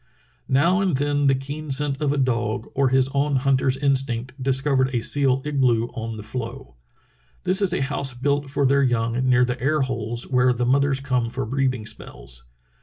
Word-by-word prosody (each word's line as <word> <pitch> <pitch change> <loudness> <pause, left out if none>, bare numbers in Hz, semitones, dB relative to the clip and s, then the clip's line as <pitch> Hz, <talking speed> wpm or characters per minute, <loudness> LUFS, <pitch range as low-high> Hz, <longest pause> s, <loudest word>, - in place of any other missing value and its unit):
'* - - -38
Now 180 +6 +3
and 185 -8 +1
then 145 0 +1
the 135 - +4
keen 145 +3 -6
scent 140 +1 -1
of 145 -2 +1
a 145 - -1
dog 120 -4 -1
or 135 -1 +2
his 130 0 +3
own 140 +1 0
hunt 135 0 +2
er's 130 0 +1
instinct 130 -3 0
discovered 135 0 +1
a - - +2
seal 135 +2 +1
igloo 125 -5 +1
on 115 -2 -6
the 105 - -8
floe. 120 +4 -7 0.7
This 185 +2 +1
is 195 -3 +2
a - - -1
house 135 -2 -2
built 140 +2 -1
for 140 0 0
their 140 +1 +3
young 115 -3 +1 0.2
near 125 0 +4
the 125 0 -4
air 150 +3 +1
holes 120 -3 -2
where 125 -1 +3
the 120 0 -1
mothers 135 +1 +2
come 125 -4 -1
for 125 +1 -4
breathing 130 -1 -1
spells. - - -9
130 Hz, 195 wpm, -23 LUFS, 125-140 Hz, 0.7 s, the